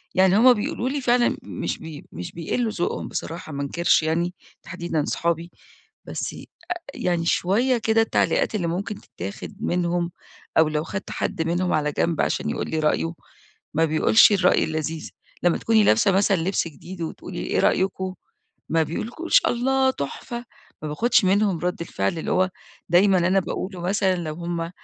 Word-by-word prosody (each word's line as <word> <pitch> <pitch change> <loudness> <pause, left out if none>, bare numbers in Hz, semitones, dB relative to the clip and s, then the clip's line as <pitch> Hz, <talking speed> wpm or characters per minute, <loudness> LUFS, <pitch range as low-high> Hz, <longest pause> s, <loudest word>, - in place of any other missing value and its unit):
يعني 190 0 +5
هم 250 +3 +7
بيقولوا 235 +3 -2
لي 280 0 -2
فعلًا 245 -1 +2
مش - - -4
ب 160 -3 -8
مش 85 +2 -7
بيقلّوا 220 +8 -2
ذوقهم 175 -4 -2
بصراحة 165 -1 -5
ما 140 -1 -4
انكرش 170 +3 +2
يعني، 170 +3 0 0.3
تحديدًا 170 -4 -2
صحابي 170 0 -1 0.5
بس - - -4
ي - - -11 0.5
يعني 175 -2 -1
شوية 235 +10 +2
كده 225 0 +2
التعليقات 225 0 +1
اللي 190 -5 0
ممكن 190 +6 -2
تتاخد 100 - -8
منهم، 175 -4 0 0.5
أو 160 - +5
لو 155 0 -1
خدت 195 +3 -5
حد 165 - -2
منهم 175 +2 0
على 150 -1 +1
جنب 170 -2 +1
عشان - - 0
يقول - - -3
لي 160 - -1
رأيه، 155 +1 +1 0.6
ما 160 +1 +3
بيقولش 160 +8 +5
الرأي 185 -3 +4
اللذيذ، 155 0 -3 0.3
لما 175 -1 +3
تكوني 220 -2 +3
لابسة 110 - +4
مثلًا 195 +1 +3
لبس 175 0 0
جديد 175 +3 -9
وتقولي 160 - -6
إيه - - 0
رأيكم، 190 0 +1 0.5
ما 165 0 +2
بيقولولكيش 230 - +1
الله 265 +2 +2
تحفة، 240 - -5 0.4
ما 155 - -3
باخدش 220 +9 +3
منهم 195 -1 +2
رد 180 0 -2
الفعل 165 -4 -2
اللي - - -4
هو 185 0 +2 0.4
دايمًا 185 +3 +5
أنا 185 +2 +3
باقوله 185 0 -5
مثلًا 190 +1 +1
لو 160 -3 -4
هم 170 0 -3
175 Hz, 160 wpm, -24 LUFS, 165-205 Hz, 0.6 s, هم